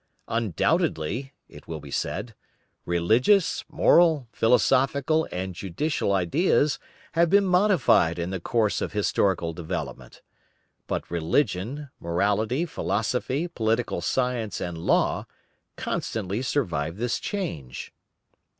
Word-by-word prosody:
"Undoubtedly," 115 - 0 0.2
it - - -14
will 80 -1 -5
be 70 -1 -11
said, 110 - -3 0.5
"religious, 115 - +3
moral, 155 -3 +4
philosophical 135 +7 +2
and 95 +1 -4
juridical 100 - -2
ideas 140 - +2 0.3
have 170 0 +3
been 200 +2 +5
modified 180 - +3
in 85 +1 -3
the 95 - -3
course 110 +3 0
of - - -3
historical 95 -5 +1
development. 80 -5 -6 0.6
But - - -3
religion, 110 - -1
morality 105 - 0
philosophy, 130 - -1
political 115 -6 -1
science, 125 -5 -1
and 85 -1 -4
law, 80 - +1 0.5
constantly 105 +1 -3
survived 85 - -1
this 120 +2 -1
change." 115 - -5
110 Hz, 105 wpm, -26 LUFS, 85-145 Hz, 0.6 s, been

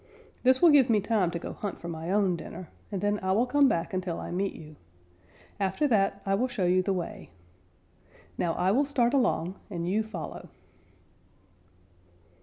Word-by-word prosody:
This 260 +4 +3
will 340 - +8
give 275 -4 +5
me 220 -2 +4
time 205 -3 +1
to 170 - -3
go - - -6
hunt 205 - -5
for 170 - -8
my 165 0 -5
own 195 -2 +2
dinner, 170 +2 -8 0.2
and 195 -3 -3
then 205 0 +1
I 190 0 +1
will 225 +5 +3
come 280 +2 +4
back 170 +2 -1
until 185 -2 -2
I - - -6
meet 190 +3 -1
you. 155 -1 -12 0.8
After 195 +9 +1
that, 200 -3 +1
I 195 - +1
will 235 +6 +1
show 240 -7 -2
you 180 +1 +3
the 195 - -1
way. 180 -3 -4 1.1
Now 170 -2 0
I 185 +2 +2
will 265 +7 +3
start 255 -3 +1
along 195 - +1
and 170 -3 -4
you 205 +4 +1
follow." 215 -7 -7
195 Hz, 185 wpm, -28 LUFS, 175-230 Hz, 1.1 s, will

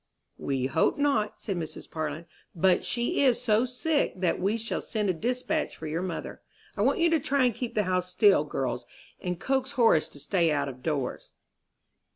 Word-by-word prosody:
"We 135 -2 -1
hope 135 +4 +1
not," 275 -8 +1
said 195 -4 -3
Mrs. 160 -3 -6
Parlin, 155 +1 -4 0.3
"but 180 +2 +3
she 240 +2 0
is 255 -4 +4
so 220 +3 +2
sick 285 +5 0
that 180 -2 0
we 200 +5 +1
shall 225 0 -3
send 210 -4 -1
a - - -2
despatch 250 - -2
for 160 - -8
your 160 +3 -2
mother. 185 -2 -5 0.3
I - - -2
want - - +3
you 340 -2 +4
to 325 - +4
try 275 -1 +1
and 245 - +2
keep 240 +1 -5
the 210 - +2
house 185 -1 0
still, 405 - +5
girls, - - -3 0.3
and 180 -2 -3
coax 265 +2 0
Horace 230 - +4
to 145 - -11
stay 170 +1 +1
out 145 -1 0
of 130 -2 -8
doors." 140 -4 -3
200 Hz, 190 wpm, -28 LUFS, 160-250 Hz, 0.3 s, still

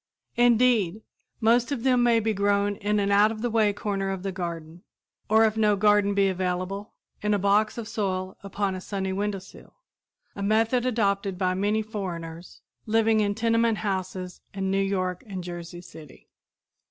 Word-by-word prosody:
Indeed, 235 -5 +3 0.4
most 235 +3 +3
of 255 -5 -2
them 255 -2 +3
may 235 -1 +4
be 220 0 0
grown 200 0 +1
in 210 +1 0
an 200 0 0
out 205 +2 +5
of 220 0 -6
the 240 - 0
way 215 -2 +3
corner 200 -1 -3
of 190 -1 -4
the 195 - -2
garden, 170 -2 -6 0.5
or 220 +1 +5
if 215 0 +1
no 210 -2 +3
garden 205 0 +3
be 200 -1 +3
available, 185 +2 -3 0.3
in 210 0 +1
a - - +2
box 205 +3 +2
of 230 -2 -5
soil 190 -4 -3
upon 200 0 -2
a 185 - -6
sunny 190 -1 -3
windowsill 195 -1 -5 0.6
a 200 - -6
method 225 +4 +2
adopted 200 -5 0
by 185 -1 +1
many 205 +3 0
foreigners 175 -6 -7 0.2
living 225 0 +3
in 205 -1 +1
tenement 230 0 +2
houses 185 -3 -4
in 190 -1 -1
New 195 0 +2
York 185 -2 -1
and 190 -3 -5
Jersey 175 0 -7
City. 160 -5 -14
200 Hz, 170 wpm, -26 LUFS, 190-220 Hz, 0.6 s, out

